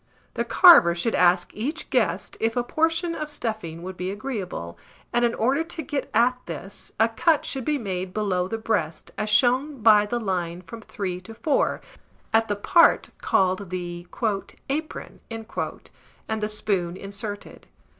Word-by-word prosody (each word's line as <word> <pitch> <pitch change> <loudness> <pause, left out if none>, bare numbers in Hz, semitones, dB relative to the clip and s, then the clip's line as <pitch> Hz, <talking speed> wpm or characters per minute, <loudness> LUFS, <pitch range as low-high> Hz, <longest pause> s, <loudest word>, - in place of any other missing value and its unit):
The 235 - -1
carver 235 - +7
should 225 +7 -1
ask 175 0 +3
each 290 +10 -4
guest 205 -8 0
if 225 +1 0
a 245 - +1
portion 325 +5 0
of 305 -2 -4
stuffing 215 - -4
would 185 0 -7
be 180 +1 -3
agreeable; 195 - -5 0.3
and 240 0 +2
in 235 -1 +2
order 265 +8 +1
to 330 0 -6
get 280 +1 -3
at 245 +3 +3
this, 175 +4 -7
a 225 - +5
cut 300 +7 +2
should 265 -3 -3
be 300 -1 +1
made 190 -6 -4
below 185 -3 0
the 225 - -3
breast, 185 -8 -2
as 215 - -2
shown 250 +4 +2
by 210 -2 +6
the 240 +3 -1
line 180 -4 -3
from 230 +5 -10
3 185 -4 -5
to 225 +4 -11
4, 300 +2 0 0.5
at 225 0 +4
the 205 - -1
part 335 - +4
called 190 0 +1
the 175 -1 -5 0.6
"apron," 310 +3 -4
and 220 -1 -6
the 210 - -1
spoon 190 -4 -1
inserted. 200 +1 -6
215 Hz, 160 wpm, -24 LUFS, 185-250 Hz, 0.6 s, carver